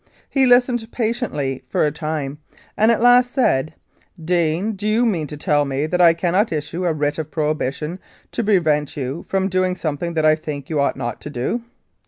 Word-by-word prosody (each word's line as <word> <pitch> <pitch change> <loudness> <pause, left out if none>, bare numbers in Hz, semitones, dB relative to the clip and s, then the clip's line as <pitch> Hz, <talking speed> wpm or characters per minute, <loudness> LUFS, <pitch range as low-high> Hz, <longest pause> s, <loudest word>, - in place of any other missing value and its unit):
He 270 -2 +2
listened 245 -2 +3
patiently 215 - -2
for - - +2
a 150 - +1
time, 150 -1 -4 0.4
and 220 +2 +3
at 230 0 +2
last 245 0 +6
said, 155 - +1 0.4
"Deane, 170 +4 0
do 210 0 -4
you 225 +3 +2
mean 170 -10 0
to 150 - -8
tell 145 0 +2
me 140 +1 -1
that 180 +3 0
I 165 -1 +6
cannot 185 +5 +1
issue 165 +3 -3
a 175 - +2
Writ 145 0 -1
of 155 -1 -4
Prohibition 155 +2 -2 0.3
to 235 - -2
prevent 155 -9 +1
you 135 +3 -3
from 190 0 -1
doing 185 -1 0
something 170 0 -3
that 155 -1 +1
I 155 - +6
think 150 -2 -5
you 150 -2 +1
ought 140 - 0
not 120 -1 -4
to - - -7
do?" 145 - -2
160 Hz, 195 wpm, -20 LUFS, 150-210 Hz, 0.4 s, last